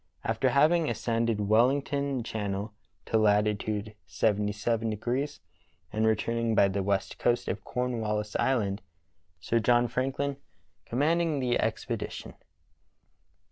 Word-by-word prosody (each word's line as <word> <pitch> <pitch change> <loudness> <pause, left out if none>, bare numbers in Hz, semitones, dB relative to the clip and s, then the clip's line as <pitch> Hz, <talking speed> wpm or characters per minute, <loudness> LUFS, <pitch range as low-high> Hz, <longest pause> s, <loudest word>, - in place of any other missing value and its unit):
After - - +1
having 155 +3 +3
ascended 115 -1 0
Wellington 135 +3 +2
Channel 105 -2 -3 0.3
to 110 - +1
Lat. 105 -1 +4
yfy 110 +4 -1 0.5
and 110 +1 +2
returning 115 +1 0
by 100 - +5
the 100 +1 -1
west 100 0 -1
coast 120 0 +1
of 100 - -3
Cornwallis 110 -4 -2
Island. 105 -7 0 0.6
Sir 115 +8 0
John 120 +2 +3
Franklin 135 +3 -2 0.5
commanding 155 +4 +1
the 125 -2 +1
Expedition. - - -3
115 Hz, 100 wpm, -28 LUFS, 105-130 Hz, 0.6 s, by